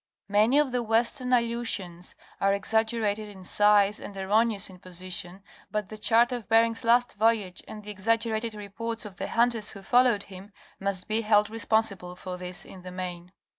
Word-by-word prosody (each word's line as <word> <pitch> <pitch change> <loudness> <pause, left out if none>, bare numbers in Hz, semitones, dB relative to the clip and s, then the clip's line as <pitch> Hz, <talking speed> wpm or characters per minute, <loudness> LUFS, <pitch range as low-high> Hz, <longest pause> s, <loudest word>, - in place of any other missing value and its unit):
Many 215 +7 +4
of 295 -3 +3
the 250 0 0
western 235 +3 0
Aleutians 230 -7 -1 0.2
are 195 0 +3
exaggerated 220 0 0
in 190 -2 -12
size 205 +2 +4
and 200 - -9
erroneous 210 +1 +2
in 185 -1 -13
position 185 +1 -5 0.3
but 210 -3 -3
the 215 - -8
chart 230 +3 +4
of 240 -5 -5
Bering's 230 +1 +3
last 240 +1 +3
voyage, 210 -4 +1
and 210 -1 -9
the 210 - -6
exaggerated 225 +2 0
reports 225 +3 -5
of 195 -4 -9
the - - -3
hunters 230 -2 +1
who 200 -2 -7
followed 240 -2 +3
him, 195 +1 -12 0.3
must 195 -1 -2
be 220 +1 +1
held 210 -1 +3
responsible 220 -5 0
for 180 0 -6
this, 180 0 -6
in 185 - -12
the 180 0 -8
main. 180 -1 -6
210 Hz, 170 wpm, -27 LUFS, 190-230 Hz, 0.3 s, Many